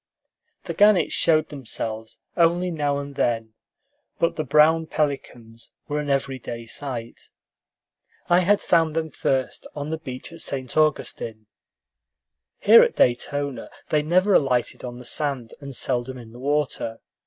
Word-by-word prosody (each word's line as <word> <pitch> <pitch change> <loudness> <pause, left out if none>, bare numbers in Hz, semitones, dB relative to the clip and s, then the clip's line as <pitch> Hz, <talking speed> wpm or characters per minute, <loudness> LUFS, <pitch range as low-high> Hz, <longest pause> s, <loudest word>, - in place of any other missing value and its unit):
The - - -5
gannets 205 -2 +4
showed 155 -1 +2
themselves 115 -5 -5 0.2
only 175 +1 +2
now 145 -3 0
and 140 0 -6
then, 115 -4 -1 0.6
but 170 - +1
the 155 - -2
brown 155 +3 +4
pelicans 120 -7 -4
were 150 0 -1
an 145 -1 -4
every 135 -1 0
day 115 -1 -7
sight. 120 -2 -7 1.0
I 175 +1 +5
had 200 +3 +3
found 165 -3 +2
them 160 -1 -2
first 130 -1 -2
on 145 +1 -4
the 160 - -3
beach 130 +1 -8
at 165 - -8
St. 130 -3 -4
Augustine. 120 -7 0 1.1
Here - - +8
at - - +2
Daytona 140 +3 0 0.2
they 150 - +2
never 185 +6 +2
alighted 125 -6 +1
on 120 -1 -6
the 125 - -10
sand, 135 -4 -2
and 140 -2 -6
seldom 130 +1 -1
in 115 -2 -11
the 120 - -12
water. 140 -5 -1
140 Hz, 145 wpm, -24 LUFS, 120-155 Hz, 1.1 s, Here